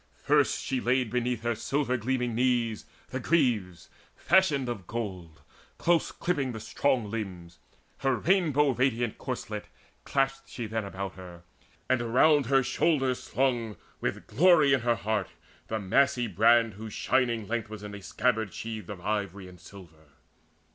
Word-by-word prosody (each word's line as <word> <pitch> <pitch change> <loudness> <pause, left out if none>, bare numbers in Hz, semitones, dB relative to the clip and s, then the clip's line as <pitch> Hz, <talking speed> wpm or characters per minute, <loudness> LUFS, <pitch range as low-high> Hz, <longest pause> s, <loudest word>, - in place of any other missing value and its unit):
First - - +2
she 130 0 -1
laid 125 -2 +1
Beneath 125 -1 -1
her 120 0 +1
silver 130 +3 -1
gleaming 125 0 -1
knees 120 -2 0 0.2
the 130 - -3
greaves 120 - 0 0.3
Fashioned 155 -8 +3
of 110 -7 -5
gold, 95 -9 -6 0.4
close 170 -1 +2
clipping 140 -8 -2
the 110 - -6
strong 115 -2 0
limbs. 90 -6 -6 0.4
Her 135 -1 +1
rainbow 150 - +2
radiant 120 -3 0
corslet - - -5 0.4
clasped 135 0 -1
she 120 - -5
then 110 0 -3
About 100 -1 -5
her, 90 -2 -11 0.4
and 130 -2 +2
around 135 +4 +4
her 135 0 +4
shoulders 135 -1 +1
slung, 120 -4 -1 0.2
With - - -3
glory 160 -4 +5
in 135 - +4
her 120 0 +1
heart, 110 -5 -2 0.4
the 110 - -2
massy 125 +5 +2
brand 115 +2 +4
Whose 110 +2 -8
shining 120 -5 0
length 115 -1 -2
was 110 -1 -8
in 105 0 -7
a 100 - -8
scabbard 110 0 0
sheathed 110 -1 -6
Of 100 -4 -7
ivory 100 -2 -3
and 90 -1 -14
silver. 80 -7 -15
120 Hz, 150 wpm, -28 LUFS, 105-130 Hz, 0.4 s, glory